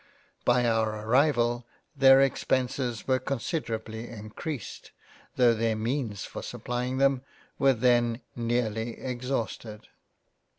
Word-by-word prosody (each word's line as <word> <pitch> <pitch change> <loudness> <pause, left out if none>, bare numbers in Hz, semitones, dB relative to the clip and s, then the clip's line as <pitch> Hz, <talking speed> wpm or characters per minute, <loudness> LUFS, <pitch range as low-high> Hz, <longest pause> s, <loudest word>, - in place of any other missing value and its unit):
By 120 0 +4
our 110 -2 0
arrival 120 -1 +2 0.3
their 135 0 +7
Expenses 130 -3 0
were 130 -1 +3
considerably 115 -4 -3
encreased 115 +4 -7 0.5
tho* 120 -2 +5
their 115 0 0
means 110 -2 -2
for - - -7
supplying 125 +1 -3
them 135 -1 +3 0.4
were 135 -1 +5
then 120 0 +2
nearly 115 -1 -1
ex 125 -1 -5
hausted. 110 -4 -3
120 Hz, 110 wpm, -28 LUFS, 115-130 Hz, 0.5 s, their